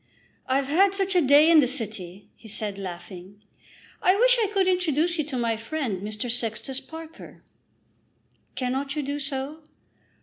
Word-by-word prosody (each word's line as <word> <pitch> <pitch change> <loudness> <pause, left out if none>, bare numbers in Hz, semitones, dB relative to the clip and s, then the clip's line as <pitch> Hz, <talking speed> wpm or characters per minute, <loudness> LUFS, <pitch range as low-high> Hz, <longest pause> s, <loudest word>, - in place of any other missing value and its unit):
"I've 265 +1 +1
had 375 +8 +3
such 390 -1 +1
a 355 - +5
day 290 +3 +6
in 325 - +8
the 270 - +4
city," 210 -7 -3
he 225 - -15
said, 210 -1 -3
laughing. 185 +1 -9 0.6
"I 370 - +4
wish - - +5
I 430 - +2
could 390 -2 +1
introduce 345 -2 +1
you - - +2
to 275 -3 -4
my 230 -2 0
friend, 225 - -3
Mr. 215 +4 -4
Sextus 240 +2 -2
Parker." 320 +4 -12 1.1
"Cannot 270 +3 -2
you 300 - -2
do 285 +1 -3
so?" 275 +2 -4
275 Hz, 160 wpm, -25 LUFS, 220-320 Hz, 1.1 s, in